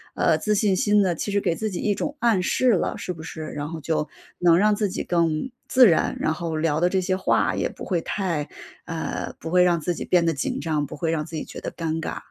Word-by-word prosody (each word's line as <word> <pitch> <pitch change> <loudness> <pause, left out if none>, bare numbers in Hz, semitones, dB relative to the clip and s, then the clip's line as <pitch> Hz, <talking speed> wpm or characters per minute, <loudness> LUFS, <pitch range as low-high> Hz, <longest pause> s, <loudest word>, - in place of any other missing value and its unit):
呃， - - +3
自 210 0 +1
信 200 -2 +2
心 205 +2 +3
呢， 185 -2 +1
其 205 - -3
实 200 - +2
给 170 - 0
自 215 +3 -2
己 175 - -4
一 205 - +1
种 290 +7 -3
暗 230 -6 +3
示 250 +5 +2
了， 190 - 0
是 180 - -4
不 160 - -10
是？ 160 -1 -7
然 150 +1 -5
后 165 - -6
就 155 0 -1 0.3
能 170 -1 +5
让 210 +2 +4
自 205 -1 0
己 - - -3
更 170 +6 0 0.2
自 255 -3 +7
然， 165 - +2
然 155 - +1
后 165 -1 -4
聊 155 -1 +1
的 175 +2 +3
这 190 +1 +1
些 185 +1 0
话 190 - +2
也 - - -1
不 - - -9
会 175 -4 0
太 165 -6 -2 0.4
呃， 165 -2 -4
不 160 - -6
会 180 0 +5
让 175 -1 +3
自 175 +3 -1
己 - - -5
变 175 -2 +3
得 165 - +2
紧 140 - -2
张， 155 -3 -1
不 - - -8
会 165 -2 -1
让 155 -2 -1
自 165 - -8
己 - - -3
觉 - - -9
得 - - -4
尴 160 -1 -3
尬。 - - -4
175 Hz, 285 characters per minute, -24 LUFS, 160-195 Hz, 0.4 s, 自